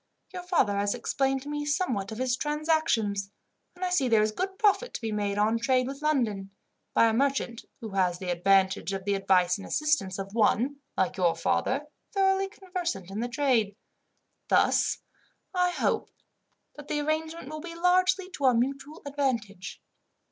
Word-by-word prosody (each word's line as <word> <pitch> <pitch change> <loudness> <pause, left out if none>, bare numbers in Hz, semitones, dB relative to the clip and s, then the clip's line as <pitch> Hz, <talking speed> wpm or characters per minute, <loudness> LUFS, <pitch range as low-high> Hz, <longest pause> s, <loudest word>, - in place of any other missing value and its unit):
Your 365 - -5
father 350 - +1
has 200 0 0
explained 270 -1 0
to - - -11
me 295 0 -2
somewhat 290 - -1
of 220 - -6
his 255 0 +1
transactions, 295 -10 0 0.5
and 365 +1 -3
I 360 - -2
see 285 -8 +2
there 225 -3 +4
is 215 - +1
good 380 - -3
profit 430 +4 +2
to - - -4
be 225 -1 -3
made 205 -1 -1
on 220 +2 +2
trade 255 +1 +2
with 275 +2 -6
London, 230 -11 0 0.5
by - - +6
a 225 - +2
merchant 260 -2 0 0.2
who 225 - -5
has 185 -3 +1
the 180 -1 -3
advantage 190 +2 +2
of 190 -1 -4
the 200 - +1
advice 185 -1 +2
and 195 - -8
assistance 300 -12 0
of 195 0 -6
one, 235 +5 +2 0.2
like 190 0 0
your 175 -3 +2
father, 260 - 0 0.3
thoroughly 385 0 +2
conversant 355 - -5
in 200 - -4
the 240 +1 -2
trade. 240 -6 +1 0.7
Thus, - - +3 0.6
I 360 -1 +2
hope 350 - -1 0.7
that 295 -1 -10
the 295 - -1
arrangement 315 0 -2
will 310 0 -6
be 335 0 -8
largely 370 +2 +2
to 285 - -3
our 255 -2 +5
mutual 275 +5 -2
advantage. 235 -9 -3
255 Hz, 175 wpm, -28 LUFS, 200-310 Hz, 0.7 s, by